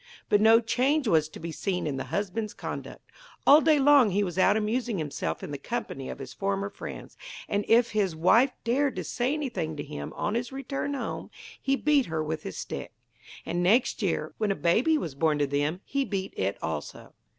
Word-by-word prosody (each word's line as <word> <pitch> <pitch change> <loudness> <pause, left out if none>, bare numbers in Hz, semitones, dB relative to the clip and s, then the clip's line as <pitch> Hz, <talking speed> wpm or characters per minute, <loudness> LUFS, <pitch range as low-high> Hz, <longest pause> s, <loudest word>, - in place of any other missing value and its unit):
But 205 - +4
no 225 +1 +7
change 255 +5 +1
was 155 -6 +3
to - - -11
be 170 - -5
seen 180 +3 -2
in 140 -3 -2
the 135 - -4
husband's 205 - -3
conduct. - - -7 0.3
All 295 +2 +8
day 310 -1 +4
long 280 -4 +6
he 200 +2 +1
was 180 -1 -3
out 200 +3 +5
amusing 225 +1 -1
himself 150 -4 -3
in - - -6
the 145 - -5
company 140 - -4
of - - -6
his 135 -2 -8
former 200 0 -2
friends, - - -8 0.3
and 205 0 0
if 235 +1 +4
his 200 -6 0
wife 230 +11 +4
dared 265 +4 +1
to - - -3
say 250 +2 -1
anything 245 - -3
to 145 - -4
him 75 0 -7
on 205 - -1
his 235 +2 -2
return 275 +1 -3
home 270 - -5 0.3
he 275 0 +2
beat 285 -1 +2
her 160 -1 -2
with 155 0 -3
his 95 - -7
stick. - - -6 0.5
And 175 +1 -1
next 225 +9 +3
year, - - -1
when 215 -1 +1
a 195 - +1
baby 240 - +3
was 165 - -4
born 150 +1 +1
to 145 - +2
them, 145 +5 -1
he 275 0 0
beat 195 -6 -3
it 95 +1 -1
also. 80 -2 -5
205 Hz, 205 wpm, -27 LUFS, 160-250 Hz, 0.5 s, All